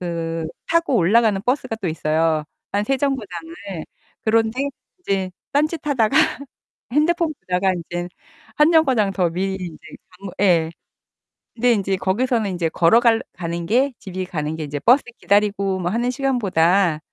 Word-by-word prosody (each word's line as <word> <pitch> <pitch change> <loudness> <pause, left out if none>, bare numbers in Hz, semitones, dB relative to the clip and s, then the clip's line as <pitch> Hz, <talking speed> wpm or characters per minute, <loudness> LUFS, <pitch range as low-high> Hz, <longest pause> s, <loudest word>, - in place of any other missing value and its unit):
그 165 -2 -3 0.2
타고 335 -3 +2
올라가는 210 +2 +3
버스가 250 -1 -1
또 200 -5 -3
있어요. 155 0 0 0.3
한 205 +1 +1
3 270 +4 +1
정거장을. 200 - -3 0.7
그런데 225 +3 +1 0.4
이제 195 - -1 0.2
딴짓하다가 290 -6 +1 0.8
핸드폰 325 +2 +2
보다가 185 +1 +1
인제 175 0 -5 0.5
1 300 +2 +5
정거장 260 -11 +3
더 180 -2 +1
미리 190 +3 -2
인제 170 -3 -7 0.3
가면 185 +1 -10
예. 170 -5 +3 0.8
근데 245 +1 +3
인제 195 -3 0
거기서는 210 +3 0
인제 175 -3 -1
걸어갈 225 +8 +4
가는 170 -1 -4
게 255 +8 +2
집이 185 -1 -5
가는 155 -3 -3
게 160 - -5
이제 145 -1 -4
버스 245 - +4
기다리고 200 -2 +1
뭐 175 -1 -1
하는 240 +5 0
시간보다 195 - +2
195 Hz, 295 characters per minute, -21 LUFS, 175-245 Hz, 0.8 s, 1